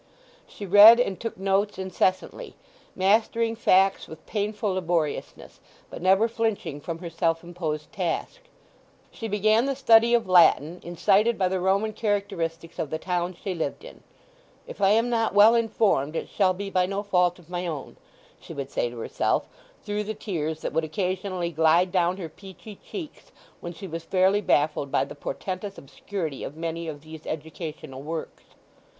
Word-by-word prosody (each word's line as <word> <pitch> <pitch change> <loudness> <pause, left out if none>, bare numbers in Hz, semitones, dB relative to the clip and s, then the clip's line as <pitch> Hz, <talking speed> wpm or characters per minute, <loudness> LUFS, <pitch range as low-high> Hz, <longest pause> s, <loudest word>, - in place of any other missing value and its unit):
She 205 - -9
read 205 +5 +9
and 195 -7 0
took 230 - -5
notes 195 +2 0
incessantly, 190 - -2 0.4
mastering 225 +4 +2
facts 195 -3 +3
with 160 0 -12
painful 210 -1 -2
laboriousness, 170 -4 -3 0.3
but - - -8
never 190 +5 +4
flinching 220 -10 -2
from 165 +2 -5
her 170 0 -7
self 165 0 0
imposed 165 -3 -5
task. 185 - -3 0.7
She 225 - -6
began 215 +3 +2
the 275 0 -1
study 235 -3 +5
of 235 - 0
Latin, 175 -2 +4
incited 195 +6 +2
by 185 -2 +1
the 190 0 -1
Roman 195 +4 +1
characteristics 195 -7 -3
of 150 - -2
the 160 - -2
town 180 +1 -2
she 195 - -3
lived 170 - -4
in. - - -12 0.6
"If - - -10
I 195 - +5
am 225 +3 +3
not 225 -3 0
well 210 +3 +8
informed 215 -10 +1
it - - -4
shall 190 -2 +2
be 195 +1 -6
by 180 -1 +2
no 200 +1 -3
fault 180 -3 +2
of 175 -3 -18
my 175 0 -4
own," 150 -5 -6 0.4
she 165 - -11
would 140 -1 -5
say 120 - -1
to 120 - -11
herself 115 - -1 0.4
through 210 0 -3
the 220 +1 -4
tears 160 -7 -4
that - - -4
would 160 - +1
occasionally 185 +1 -2
glide 165 +3 +3
down 180 0 +1
her 180 -4 -5
peachy 195 +5 -12
cheeks 330 -7 -9 0.3
when 175 - -6
she 195 +3 -9
was 165 -2 -6
fairly 190 +3 +2
baffled 150 -5 +1
by - - +2
the - - -9
portentous 190 +6 -5
obscurity 150 +2 -6
of 145 - -7
many 165 0 -4
of 145 -2 -6
these 160 0 -11
educational 155 -3 -6
works. 160 +2 -6
185 Hz, 170 wpm, -25 LUFS, 165-205 Hz, 0.7 s, read